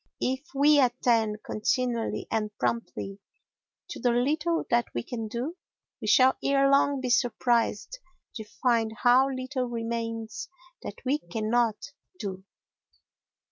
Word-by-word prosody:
If 260 +1 -1
we 290 +2 +5
attend 235 -4 +2
continually 235 +1 -1
and 215 -1 0
promptly 205 -4 -3 0.7
to - - -7
the 245 - +2
little 300 +8 +1
that 235 0 +3
we 120 - -1
can 225 -3 -5
do, 255 +11 -4 0.4
we - - -4
shall 260 0 +5
ere 275 0 +3
long 275 -1 +3
be 250 -1 -1
surprised 240 - +1 0.3
to 220 - -6
find 225 0 0
how 255 +2 +5
little 255 0 -3
remains 230 -1 -4 0.3
that 205 - -9
we 280 +4 +1
cannot 225 -2 -1 0.3
do. 190 - -6
240 Hz, 125 wpm, -27 LUFS, 225-265 Hz, 0.7 s, we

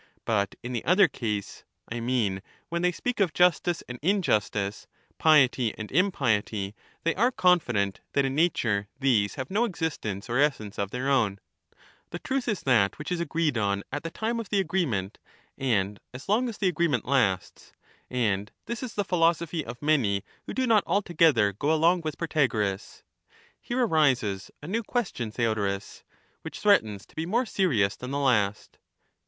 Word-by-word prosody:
But 100 -3 0
in 125 +1 -5
the 120 - -2
other 190 +2 +5
case, 105 -5 -4 0.2
I 120 - -4
mean 115 -6 0 0.3
when 170 +1 -2
they 180 0 +3
speak 245 +6 -3
of 180 -8 +1
justice 175 -1 +2
and 125 0 -7
injustice, 105 - 0 0.3
piety 130 -7 +4
and 110 -1 -7
impiety, 115 - +1 0.3
they 165 - +2
are 235 +6 +3
confident 120 - +1
that 140 - +2
in 135 - -1
nature 120 -10 +1
these 115 -7 +2
have 130 +3 -5
no 210 +4 +2
existence 160 - -3
or 120 +3 0
essence 120 -9 0
of 100 -1 -1
their 125 +4 -3
own 115 -8 +2 0.4
— - - -30
the 175 - -5
truth 265 +7 -2
is 210 -6 -1
that 115 -7 +3
which 150 - -6
is 175 - 0
agreed 160 -5 0
on 100 -1 0
at 145 +2 -3
the 165 - -5
time 225 +6 -2
of 225 -5 -6
the 205 - +2
agreement, 130 - -1 0.4
and 105 -6 0 0.2
as 130 - -9
long 235 +5 +2
as 225 - -7
the 195 - +1
agreement 165 -8 +1
lasts; 110 -9 0 0.4
and 105 -5 -1
this 235 0 -4
is 255 -4 -6
the 205 - 0
philosophy 165 -2 +1
of 120 +2 -9
many 120 -11 +2 0.2
who - - -4
do 260 - +1
not 225 -4 +4
altogether 165 - +3
go 140 +10 -1
along 165 +3 +3
with 155 -2 -4
Protagoras. 115 - -1 0.6
Here 245 +1 0
arises 130 - +1
a - - -7
new 220 +6 -1
question, 200 - -2
Theodorus, 105 -4 -2 0.4
which - - -8
threatens 110 - +2
to - - -25
be 160 +1 -3
more 235 +7 +1
serious 125 - +1
than 125 - -8
the 140 - -2
last. 110 -7 0
135 Hz, 170 wpm, -27 LUFS, 105-180 Hz, 0.6 s, other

